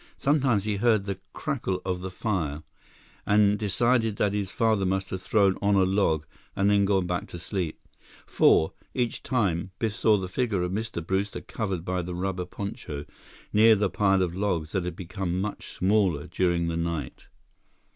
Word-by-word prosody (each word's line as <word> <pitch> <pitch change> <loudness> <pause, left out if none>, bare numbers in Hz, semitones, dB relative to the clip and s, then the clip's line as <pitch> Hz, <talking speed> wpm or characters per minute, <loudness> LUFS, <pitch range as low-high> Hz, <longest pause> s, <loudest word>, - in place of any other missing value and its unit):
Sometimes 135 -8 +2
he 105 -1 -1
heard 110 -2 +3
the 100 -2 -4
crackle 130 - -2
of 90 -1 -2
the 95 - -4
fire 85 -7 -2 0.6
and 105 0 +4
decided 115 +1 +2
that 100 -1 +1
his 100 -2 -2
father 110 -2 +1
must 95 0 -1
have 95 - -3
thrown 100 -1 +2
on 100 0 +3
a 95 - +5
log 95 -5 +1 0.3
and 100 +1 +3
then 100 -1 +4
gone 95 -2 +2
back 90 0 -2
to - - -8
sleep. 85 -2 -3 0.5
For, 80 - +4 0.2
each 120 -2 -1
time, 95 -9 0
Biff 110 -3 -1
saw 110 -2 +4
the 95 -2 -3
figure 100 -2 -1
of 90 - -2
Mr. 100 -5 -3
Brewster 95 +3 -1
covered 95 -6 -4
by 90 0 -1
the 90 0 -5
rubber 90 0 -2
poncho, 85 -6 -6 0.5
near 110 +1 +7
the 100 -2 0
pile 95 -2 +3
of 85 -2 -2
logs 90 -6 -1
that 95 -2 -1
had 90 -2 -4
become 90 0 -3
much 105 +2 -4
smaller 95 -6 +2
during 85 -2 0
the 85 0 -2
night. 85 -6 -4
95 Hz, 175 wpm, -27 LUFS, 90-105 Hz, 0.6 s, near